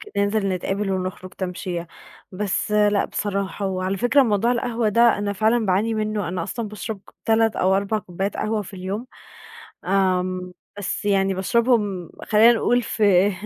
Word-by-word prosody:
ك - - -10
ننزل 200 0 +1
نتقابل 195 +2 -2
ونخرج 185 0 -4
تمشية، 180 -2 -4 0.5
بس 200 +2 -2
لأ 210 -1 +3
بصراحة، 200 0 -3
وعلى 190 0 -2
فكرة 245 +7 +4
موضوع 230 0 +2
القهوة 235 -2 0
ده، 230 0 +4
أنا 205 0 -1
فعلًا 220 +3 +1
باعاني 200 +5 +1
منه، 215 -3 -2
أنا 175 -1 -3
أصلًا 215 +4 -4
باشرب 215 0 -6
ك - - -16
3 225 0 +2
أو 190 +1 +3
4 200 +2 0
كوبّايات 190 +1 -4
قهوة 215 -1 -1
في 195 - -11
اليوم، 195 +6 -5 0.8
آمم 185 -1 0 0.3
بس 205 - -3
يعني 195 -1 +2
باشربهم 205 -3 +1
خلّينا 220 +2 +6
نقول 245 +1 +2
في 205 -3 +3
200 Hz, 155 wpm, -22 LUFS, 185-220 Hz, 0.8 s, خلّينا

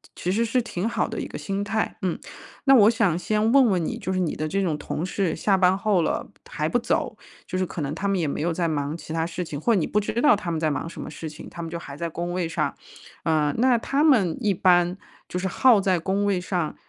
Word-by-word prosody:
其 180 - -2
实 230 +4 +1
是 245 +2 +1
挺 220 -3 -3
好 - - 0
的 - - -5
一 - - -4
个 - - -7
心 195 0 -3
态， 220 +1 -2
嗯。 185 -3 -1 0.5
那 270 - +7
我 215 -4 +7
想 225 -8 +2
先 215 +3 +1
问 275 +1 +6
问 180 -6 +1
你， - - -3
就 185 - -3
是 185 - -1
你 175 -4 -1
的 155 - -2
这 195 +6 -1
种 165 -5 0
同 155 +3 -3
事 185 -3 -1
下 195 +4 +2
班 185 0 +4
后 205 -4 +2
了 160 - -1 0.2
还 - - -2
不 - - +1
走， - - -1 0.3
就 185 - -4
是 185 - +1
可 170 - -6
能 145 +1 -2
他 190 +5 -3
们 195 -1 +1
也 160 - 0
没 140 - -3
有 170 +3 0
在 170 +1 0
忙 150 0 -2
其 160 - -8
他 160 0 0
事 175 +2 -4
情 145 -3 -6
或 235 - +2
者 200 - +3
你 160 - 0
不 210 - +1
知 210 - -3
道 300 - +6
他 190 -4 -5
们 160 - -1
在 155 -2 +1
忙 165 - -3
什 - - -10
么 - - -6
事 160 +1 -6
情， 150 +1 -11
他 170 - -8
们 165 - -5
就 170 - -4
还 140 -4 -9
在 170 +3 -3
工 175 +2 -4
位 180 -2 -1
上。 - - -1 0.5
呃， 150 -2 +1
那 250 -1 +4
他 275 +5 0
们 225 - +4
一 210 - +2
般 175 0 +3 0.3
就 180 - -3
是 190 - -1
耗 230 +4 +5
在 185 -3 +2
工 195 +4 0
位 200 -2 +1
上， 175 -4 -2
180 Hz, 295 characters per minute, -24 LUFS, 165-205 Hz, 0.5 s, 那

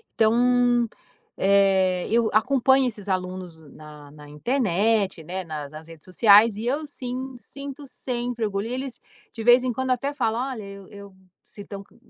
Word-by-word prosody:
Então, 240 +1 +3 0.5
eh, 190 -2 +3
eu 230 0 +2
acompanho 265 +3 +3
esses 205 -4 -7
alunos 185 -2 -4
na 150 -1 -13
na 150 -1 -14
internet 200 - 0
né, 185 +4 -5
na 155 -4 -6
nas 155 +2 -11
redes 165 -2 -11
sociais 205 +3 +5
e 220 - -5
eu 290 +5 -1
sim, 260 -1 -6
sinto 280 +2 -9
sempre 245 -2 -3
orgulho 200 +1 -2
e 245 - -4
eles 260 -1 -5 0.3
de 225 - -6
vez 245 +2 +6
em 250 -2 -1
quando 260 +2 -3
até 275 +3 -1
falam 235 -4 -1
olha 225 -5 -6
eu 200 -1 -10
eu 200 -2 -12 0.3
se 205 - -13
estão, 200 -1 -8
co - - -27
220 Hz, 170 wpm, -24 LUFS, 185-245 Hz, 0.5 s, vez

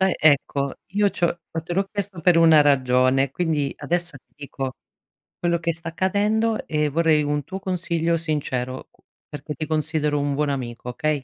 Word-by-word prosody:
Eh, 190 -1 +3
ecco, 140 -2 +2 0.2
io 205 0 +3
c'ho 175 -1 -1 0.2
te 175 - -5
l'ho 195 +2 0
chiesto 200 -3 -4
per 175 +1 +4
una 165 -2 +7
ragione, 130 -1 +3
quindi 155 -5 -1
adesso 175 -3 -2
ti 135 - -22
dico 135 -2 -5 0.7
quello 170 0 +1
che 170 0 -1
sta 165 +1 -7
accadendo 210 +6 0
e 150 -1 0
vorrei 155 0 +3
un 145 0 -1
tuo 190 - -6
consiglio 170 -3 -1
sincero, 135 -5 -3
u - - -32 0.3
perché 150 +1 -7
ti 155 - -4
considero 155 -1 0
un 140 0 -1
buon 150 +1 0
amico, 125 -3 -4
okay? 125 +5 -2
155 Hz, 170 wpm, -23 LUFS, 140-175 Hz, 0.7 s, una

